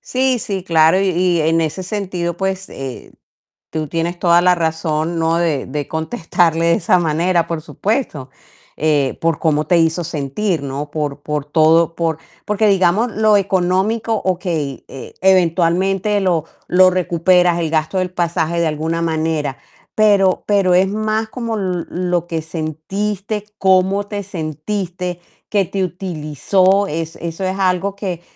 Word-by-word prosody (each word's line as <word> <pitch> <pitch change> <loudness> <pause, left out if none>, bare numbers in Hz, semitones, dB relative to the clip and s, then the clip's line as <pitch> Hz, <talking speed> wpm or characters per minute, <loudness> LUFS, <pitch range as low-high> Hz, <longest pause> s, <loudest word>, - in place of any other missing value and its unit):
Sí, 260 0 0
sí, 195 -4 -4
claro. 165 +1 +4
Y 195 - +1
y 175 -1 +1
en 165 +1 +2
ese 160 +4 -2
sentido, 180 -3 -3
pues, 190 0 -3
eh, 135 -2 -8 0.6
tú 155 -1 -3
tienes 165 +3 -2
toda 175 -1 +4
la 180 0 +5
razón, 160 0 -1
¿no? 165 0 +1
De 160 -5 0
de 145 +1 -4
contestarle 165 -1 0
de 170 - +4
esa 180 +2 +2
manera, 170 +1 +1
por 165 -2 -3
supuesto. 180 - -3 0.5
Eh, 145 -3 +1
por 165 -2 +1
cómo 155 -2 +1
te 175 - +3
hizo 165 +1 +1
sentir, 160 +3 -2
¿no? 140 +2 -5
Por 145 -2 -3
por 150 -1 -3
todo, 160 +2 +3
por 165 -2 -1 0.3
porque 210 +1 +2
digamos 195 +4 +3
lo 215 0 +3
económico, 195 +4 +1
okey, 170 -7 -2
e-eventualmente 185 +5 +1
lo 175 -5 +1 0.2
lo 185 +1 +6
recuperas, 180 -1 +2
el 160 -2 -1
gasto 155 +4 0
del 185 -1 -1
pasaje 170 -1 -1
de 165 - +2
alguna 160 +2 -2
manera, 160 -4 -1 0.4
pero 200 -3 +3
pero 195 -3 +3
es 185 +2 +4
más 215 +1 -1
como 230 -1 -4
l-lo 180 -2 -2
que 165 -1 -2
sentiste, 195 +7 -4
cómo 190 +1 +3
te 205 -1 -4
sentiste, 175 +1 -4 0.3
que 200 -2 +2
te 195 +2 -2
utilizó. 185 +3 +1
Es 165 +1 -4
eso 170 +2 -5
es 190 +1 -2
algo 190 +1 0
que 185 -4 -4
175 Hz, 150 wpm, -18 LUFS, 160-190 Hz, 0.6 s, lo